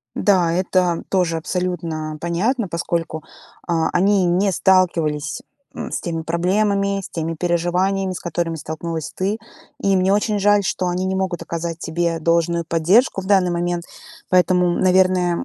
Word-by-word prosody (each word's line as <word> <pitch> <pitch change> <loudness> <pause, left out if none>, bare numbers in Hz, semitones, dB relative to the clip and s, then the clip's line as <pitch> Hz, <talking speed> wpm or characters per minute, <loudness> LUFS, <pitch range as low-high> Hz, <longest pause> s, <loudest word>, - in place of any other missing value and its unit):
Да, 180 -5 +2
это 180 -1 +1
тоже 175 -4 +1
абсолютно 165 -3 -3
понятно, 200 +7 0
поскольку, 170 -2 -3 0.4
а, 165 -2 +1
они 195 +1 +3
не 185 +3 +2
сталкивались, 165 -6 +1 0.3
м, - - -6
с - - -3
теми 165 -2 -3
проблемами, 200 +4 0
с - - -7
теми 165 0 -3
переживаниями, 180 +3 0
с 180 - -6
которыми 170 -1 -2
столкнулась 160 0 -5
ты. 200 +4 -2 0.4
И 195 -4 +2
мне 185 +1 +2
очень 210 +1 +1
жаль, 205 0 +4
что 185 -1 -1
они 180 +1 -1
не 190 0 -1
могут 190 -2 -2
оказать 170 0 -4
тебе 165 0 -1
должную 170 +1 +1
поддержку 180 +7 +2
в - - -9
данный 190 -3 +3
момент. 175 0 -2 0.5
Поэтому, 180 -1 +3
наверное, 185 0 +2
175 Hz, 150 wpm, -20 LUFS, 165-190 Hz, 0.5 s, жаль